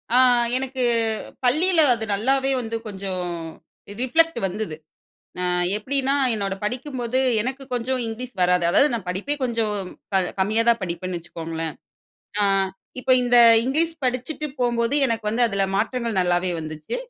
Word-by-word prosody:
ஆ - - +6 0.4
எனக்கு 260 -1 -3 0.6
பள்ளியில 320 +7 +3
அது 225 -2 -4
நல்லாவே 265 +6 +1
வந்து 230 -1 -4
கொஞ்சம் 190 -3 -4 0.8
ரிஃப்ளெக்ட் 325 +6 +2
வந்தது. 185 -3 -4 1.0
எப்டீன்னா 270 +5 0 0.2
என்னோட 200 -2 -2
படிக்கும்போது 250 +1 -2 0.2
எனக்கு 260 +4 -3
கொஞ்சம் 250 +2 0
இங்கிலீஷ் 240 +3 -6
வராது. 180 -1 +3
அதாவது 275 +11 +5
நான் 220 -6 -4
படிப்பே 200 +11 -2
கொஞ்சம் 230 -4 0 0.4
கம் 190 -2 +2
கம்மியா 215 +4 +2
தான் 235 -1 +4
படிப்பேன்னு 175 0 -4
வச்சுக்கோங்களேன். 165 -1 -5 0.7
அ - - +3 0.6
இப்போ 255 - +2
இந்த 245 0 +3 0.3
இங்கிலீஷ் 320 +6 0
படிச்சுட்டு 255 +5 -2
போம்போது 235 +1 +1
எனக்கு 230 -2 -2
வந்து 230 +3 0
அதுல 200 -3 0
மாற்றங்கள் 230 0 -1
நல்லாவே 180 0 +1
வந்துச்சு. 155 - -5
230 Hz, 130 wpm, -23 LUFS, 190-260 Hz, 1.0 s, ஆ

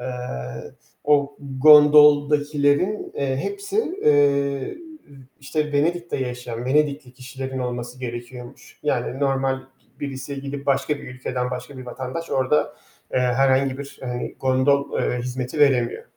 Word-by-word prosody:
Eee, 125 - -6 1.0
o 145 -1 +2
gondoldakilerin, 150 +4 +5
eee, 135 -1 -1
hepsi, 400 - -4 0.3
eee, 140 -2 +3
ı - - -10 0.6
işte 150 +2 -2
Venedik'te 170 +4 0
yaşayan, 125 -2 -5
Venedikli 140 -1 0
kişilerin 130 +1 -7
olması 125 0 -5
gerekiyormuş. 120 0 -8
Yani 135 - -1
normal 135 -1 0 0.4
birisi 135 0 -5
gidip 140 0 -6
başka 140 +2 +1
bir - - -10
ülkeden 125 0 -3
başka 125 +2 -7
bir 130 - -9
vatandaş 130 +6 -6
orda, 130 +3 +1 0.4
eee, - - +2
herhangi 130 +1 +2
bir, 140 0 -9
eee, 125 -1 -4
gondol, 135 +2 +2
eee, 125 - -1
hizmeti 125 +2 -4
veremiyor. 130 -5 +3
135 Hz, 120 wpm, -22 LUFS, 125-145 Hz, 1.0 s, gondoldakilerin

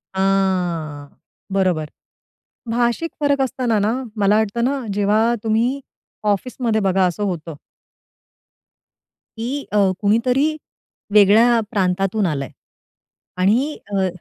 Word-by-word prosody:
हां. 180 -6 0 0.5
बरोबर. 180 -6 0 0.8
भाषिक 240 +7 0
फरक 285 -1 +2
असताना 250 -3 0
ना, 220 - +1 0.3
मला 205 +2 +4
वाटतं 220 +2 -1
ना, 280 - 0 0.2
जेव्हा 210 +2 +2 0.2
तुम्ही 235 +5 0 0.5
ऑफिसमध्ये 225 +1 -2
बघा 190 -1 +2
असं 180 +4 -2
होतं. 165 -5 -4 1.8
की 260 +5 -3
अ, - - +2 0.2
कुणीतरी 235 +6 +2 0.7
वेगळ्या 220 +4 +6
प्रांतातून 195 +1 0
आलंय. 140 -6 -2 0.9
आणि 235 +11 +1 0.2
अ. 190 -1 +2
210 Hz, 95 wpm, -20 LUFS, 190-240 Hz, 1.8 s, वेगळ्या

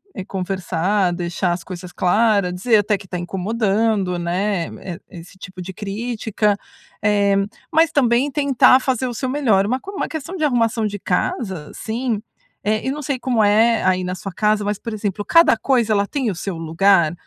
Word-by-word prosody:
É 190 - -5
conversar, 185 0 -1
deixar 175 +1 -1
as 175 0 -5
coisas 180 0 -8
claras, 200 +1 +2
dizer 220 +5 +3
até 205 0 +1
que 195 0 -14
tá 180 -1 -4
incomodando, 195 +1 0
né. 180 +1 -1 0.5
E 180 - -9
esse 175 +3 -14
tipo 185 -1 -9
de 185 +2 -6
crítica, 210 0 -1 0.5
eh, 205 -1 +3 0.4
mas 325 0 +4
também 265 -1 +2
tentar 275 -3 +4
fazer 260 -1 0
o 245 - -4
seu 255 +3 -3
melhor. 240 -9 +2
Uma 255 +4 0
co 390 - -9
uma 395 - -3
questão 320 +3 -6
de 325 - -3
arrumação 230 -4 +1
de 205 0 -5
casa, 185 - -2
assim, 230 0 -3 0.4
eh, 215 +1 0
e - - +1
não 295 +2 -5
sei 275 -2 -2
como 240 -4 +1
é, 220 +2 +4
aí 185 0 +2
na 180 0 -3
sua 195 +1 -7
casa. 210 +2 +1
Mas, 205 -1 -2
por 230 - -6
exemplo, 205 -1 -3
cada 335 -7 +5
coisa 235 -1 +1
ela 200 -1 +1
tem 260 -4 -1
o - - -6
seu 180 0 -4
lugar? 165 0 +3
210 Hz, 190 wpm, -20 LUFS, 185-235 Hz, 0.5 s, cada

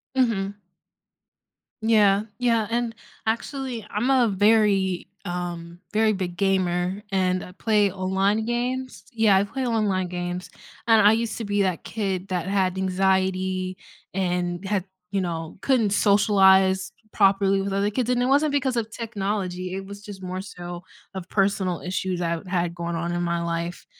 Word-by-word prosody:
Mhm. 205 -6 0 1.2
Yeah 210 -2 +4 0.2
yeah, 230 -3 +2
and 235 0 -1 0.3
actually 240 0 -3
I'm 220 +5 -1
a 260 -3 +4
very, 200 -2 +2 0.2
um, 175 -1 -5
very 220 0 +3
big 185 -3 -3
gamer, 185 0 0
and 185 -1 +1
I 180 - -11
play 210 0 +2
online 195 +3 0
games 250 +2 -2
Yeah, 220 -4 +4
I 195 - +3
play 260 +6 -3
online 205 -6 +1
games, 180 0 -4 0.4
and 225 -1 +6
I 210 - +8
used 225 -1 -1
to 230 - -4
be 205 0 +1
that 185 -3 0
kid 195 -4 -3
that 180 -1 -2
had 190 -2 +1
anxiety, 190 0 0 0.4
and 180 -1 -1
had, 195 -2 0 0.3
you 200 -1 0
know, 165 -3 -4
couldn't 240 -7 +2
socialize 190 -2 +4 0.2
properly 195 -1 +3
with 195 0 -3
other 200 +1 +1
kids, 245 +3 -1
and 245 -1 +2
it - - +2
wasn't 285 +3 +3
because 270 -3 0
of 225 -2 -2
technology, 195 -5 -3
it 195 0 -5
was 200 +1 -10
just 205 -2 -9
more 185 0 -4
so, 175 -2 -8 0.3
of 185 -2 -7
personal 195 -3 +1
issues 185 0 -2
I've 170 0 -2
had 175 -2 -1
going 170 -1 -3
on 170 +1 -2
in 175 - -1
my 170 -1 -1
life, 170 +1 -3
195 Hz, 160 wpm, -24 LUFS, 180-215 Hz, 1.2 s, I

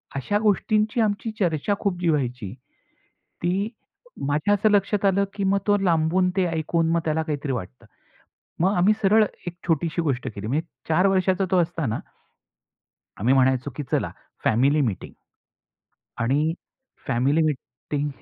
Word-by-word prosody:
अशा 205 +10 0
गोष्टींची 215 +1 +2
आमची 210 +1 0
चर्चा 175 +1 +1
खूप 190 -4 -1
जी 170 - +2
व्हायची. 125 -9 -1 0.9
ती 190 +5 0 0.6
माझ्या 155 +9 +2
असं 210 +2 +3
लक्षात 205 0 +2
आलं, 200 0 +3
की 200 -1 -2
मग 195 +1 +3
तो 205 0 +4
लांबून 180 0 +2
ते 190 - +3
ऐकून 165 0 0
मग 170 - +2
त्याला 160 0 0
काहीतरी 145 -3 -3
वाटतं. 90 - -6 0.7
मग 190 +4 +2
आम्ही 190 +5 +4
सरळ 215 +2 +5 0.2
एक 175 - -4
छोटीशी 165 0 0
गोष्ट 135 -6 -1
केली. 100 +2 -5
म्हणजे 155 +7 -1 0.2
4 180 +5 +4
वर्षाचा 190 0 +2
तो 185 - +4
असताना 160 -9 -2 1.2
आम्ही 125 +5 +3
म्हणायचो, 130 +1 +2
की 150 - -3
चला - - +1 0.3
फॅमिली 135 +7 +3
मीटिंग. 110 -9 -2 1.1
आणि 145 +7 +1 0.5
फॅमिली 135 +5 +2
मीटिंग 145 0 -3
165 Hz, 140 wpm, -24 LUFS, 140-195 Hz, 1.2 s, सरळ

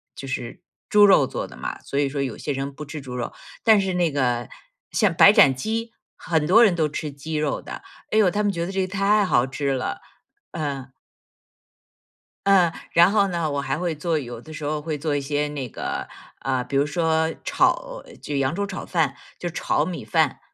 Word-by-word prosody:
就 135 - -8
是 125 +4 -5 0.3
猪 210 0 +7
肉 150 -8 +6
做 - - -4
的 - - -13
嘛， - - -5
所 140 - -3
以 140 - +2
说 140 0 -3
有 130 -5 -3
些 145 - -4
人 135 +1 -3
不 150 +2 -8
吃 145 +1 -7
猪 125 -2 -8
肉。 120 -1 -4 0.3
但 220 -3 +6
是 190 -1 -1
那 175 -3 +1
个， 125 -4 0 0.4
像 210 -5 +3
白 195 +4 +8
斩 135 -8 +6
鸡， 225 - -3 0.2
很 160 -4 -1
多 220 +8 +6
人 195 -6 +4
都 155 -2 +1
吃 150 0 -4
鸡 155 +3 -6
肉 150 0 -1
的， - - -8 0.3
哎 215 - +2
哟， 195 -4 +5
他 210 +4 -1
们 205 - +2
觉 170 -2 -2
得 190 - -5
这 195 0 0
个 185 - -1
太 200 +2 +2
好 125 -7 +2
吃 140 +1 -2
了。 130 -1 -2 0.5
嗯。 140 -4 -4 1.6
嗯， 180 -4 +5 0.2
然 170 +3 +6
后 200 -2 +3
呢， 170 -4 -1
我 140 - -1
还 140 - -2
会 175 -1 -1
做 160 +1 -1
有 120 -4 -6
的 155 +6 -12
时 155 - -7
候 150 +1 -2
会 155 -1 -3
做 150 0 -2
一 145 - +1
些 145 +1 -1
那 140 -4 -4
个， - - -4 0.3
呃， 130 0 -1
比 135 +2 -2
如 140 - +3
说 160 +1 +1
炒 - - +1 0.2
就 145 -1 -3
扬 135 +4 0
州 200 0 -1
炒 190 -3 -6
饭， 160 -6 +1 0.2
就 175 - -4
炒 170 - 0
米 175 -11 -5
饭。 110 - +1
155 Hz, 230 characters per minute, -23 LUFS, 140-185 Hz, 1.6 s, 白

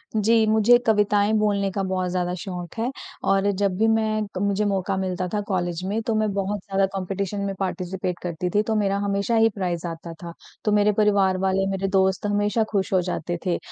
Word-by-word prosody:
जी, 220 +1 +4
मुझे 220 +2 +5
कविताएँ 210 -1 +3
बोलने 200 -2 +1
का 195 - -2
बहुत 185 -1 -1
ज़्यादा 180 -1 -1
शौक 180 -3 -6
है। 235 +3 -1 0.4
और 195 +1 +3
जब 200 0 0
भी 220 +2 +3
मैं 220 -1 +1 0.2
मुझे 200 +1 +1
मौका 195 -1 0
मिलता 185 -1 -2
था 210 - +1
कॉलेज 175 -3 -2
में 210 +4 -1
तो 225 - +1
मैं 215 -1 +1
बहुत 200 +1 -2
ज़्यादा 195 +1 0
कॉम्पिटिशन 195 +1 -3
में 195 - -2
पार्टिसिपेट 185 -1 -3
करती 175 0 -3
थी 205 +4 +2
तो 220 - +1
मेरा 200 -2 +1
हमेशा 200 +3 0
ही 225 0 +5
प्राइज़ 180 -4 -2
आता 165 0 -7
था। 170 0 -7 0.3
तो 210 - +2
मेरे 210 0 +4
परिवार 200 -3 +3
वाले 190 0 +1
मेरे 195 0 -1
दोस्त 190 0 +1
हमेशा 205 +2 +1
खुश 195 -3 -1
हो 185 - +4
जाते 175 -1 -3
थे। 175 -2 +1
195 Hz, 200 wpm, -24 LUFS, 185-210 Hz, 0.4 s, मुझे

